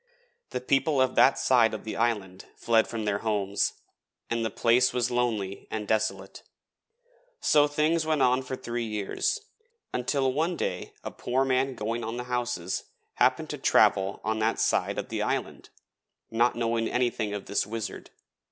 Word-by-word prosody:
The 125 - -4
people 135 +2 +2
of 130 -1 +3
that 135 - +5
side 115 -4 +3
of 110 - -8
the 110 - -5
island 100 -5 -1
fled 115 -1 +2
from 110 -2 -4
their 100 -1 0
homes, 100 -2 0 0.6
and 115 -1 0
the 115 - 0
place 120 +4 +3
was 125 -1 0
lonely 110 -6 -1
and 105 -1 -4
desolate. 110 0 -1 1.0
So 150 -1 +4
things 155 +3 +1
went 155 -3 +1
on 125 +1 +3
for 130 0 -5
three 120 -2 -4
years, 105 - -1 0.5
until 130 +1 0
one 165 +5 0
day - - -3
a - - -5
poor 130 +2 0
man 130 0 +1
going 115 +2 -3
on 115 +2 -4
the 125 - -3
houses 125 -7 -2 0.3
happened - - +2
to - - -5
travel 95 0 +3
on 110 +1 -1
that 110 +1 +1
side - - +1
of - - -4
the - - -2
island, - - -3 0.6
not 120 +2 +2
knowing 115 -1 0
anything 120 -4 -1
of 100 - -6
this 100 0 -1
Wizard. 115 0 -5
120 Hz, 165 wpm, -27 LUFS, 110-130 Hz, 1.0 s, that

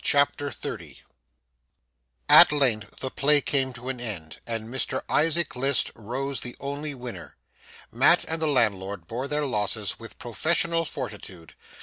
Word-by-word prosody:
CHAPTER 145 0 +3
30 - - -7 1.3
At - - +9
length 120 -8 0
the 130 - -3
play 145 +1 +4
came 135 -2 0
to 125 +1 -7
an 130 -2 -4
end, 95 -10 -5
and 115 -1 -3
Mr 130 +3 -2
Isaac 165 0 +1
List 135 +1 +1
rose 130 +5 -4
the 120 - -5
only 145 +1 -4
winner. 125 -2 -8 0.5
Mat - - +4
and 160 0 -3
the 160 - +2
landlord 100 - 0
bore 120 +8 -4
their 150 +1 0
losses 105 -4 -1
with 115 0 -11
professional 165 +8 0
fortitude. 100 - -7
130 Hz, 140 wpm, -26 LUFS, 110-145 Hz, 1.3 s, At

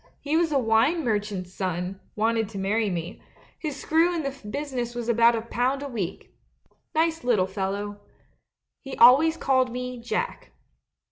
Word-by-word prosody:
He 295 +2 -2
was 330 -1 +2
a 285 - +3
wine 255 +7 +2
mer 215 -3 +2
chant's 190 -3 -7
son 185 0 -3
— - - -38
wanted 225 0 +1
to 215 - -8
marry 205 +3 0
me; 175 +2 -5 0.4
his 300 -4 -4
screw 335 +3 +2
in 325 - -2
the 275 -1 -3
business 255 -3 -4
was 240 -1 -4
about 235 0 +5
a 225 - -3
pound 250 +4 -1
a - - -4
week. 205 -9 -5 0.6
Nice 325 -1 +1
lit 245 -3 +3
tle 185 - +2
fellow. 200 +1 -4 0.8
He 270 -1 -8
always 275 +7 +7
called 260 -2 +2
me 250 0 -5
"Jack." 355 - -4
235 Hz, 175 wpm, -25 LUFS, 205-275 Hz, 0.8 s, always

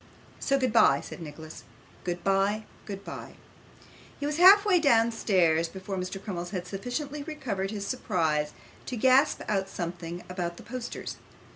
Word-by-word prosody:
'So 275 - +2
goodbye,' 235 - +4
said 175 - -9
Nicholas; 155 0 -9 0.4
'goodbye, 195 +4 +1 0.2
goodbye.' 200 -1 -7 0.8
He 285 - -3
was 295 +1 -1
half 390 +4 +8
way 380 -4 +5
downstairs 225 - +3
before 190 +2 -6
Mr. 185 +1 -4
Crummles 175 -4 -5
had 180 -2 -4
sufficiently 250 - -4
recovered 255 - -3
his 205 -1 -4
surprise 160 - 0 0.4
to 250 - -3
gasp 260 +5 +4
out 195 -2 0
something 175 0 -5
about 175 -2 -4
the - - -11
posters. 250 -1 -6
195 Hz, 135 wpm, -28 LUFS, 175-255 Hz, 0.8 s, half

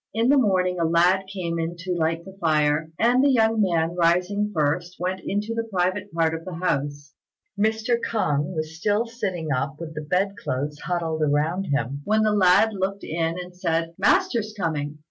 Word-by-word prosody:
In 230 +3 +2
the 285 - +5
morning 185 -5 +1
a - - +1
lad 175 +4 +3
came 170 -4 -3
in 165 +1 -2
to 180 +1 -3
light 165 0 -1
the 190 - -11
fire; 155 -1 +2
and 245 +3 +3
the 285 - +5
young 225 -3 +3
man, 170 -4 +1
rising 180 +4 +2
first, 170 +2 -1
went 185 +1 -2
into 210 +3 -2
the 230 0 -3
private 185 +2 -1
part 165 -1 +1
of 165 0 -5
the 185 -1 -7
house. 145 -4 -2 0.4
Mr. 220 +3 +1
K'ung 150 -9 0
was 160 +1 -5 0.4
sitting 175 -8 -2
up 135 +2 -1
with 165 -1 -7
the 150 - -5
bed 190 +6 0
clothes 145 +3 -2
still 180 +3 -3
huddled 160 -3 0
round 160 +6 0
him, 140 0 -1
when 215 +4 +2
the 215 -1 +2
lad 200 +2 +4
looked 195 0 -3
in 165 +1 -2
and 180 0 -8
said, 165 -1 -1
"Master's 235 - +2
coming!" 150 -5 -2
175 Hz, 185 wpm, -24 LUFS, 160-200 Hz, 0.4 s, the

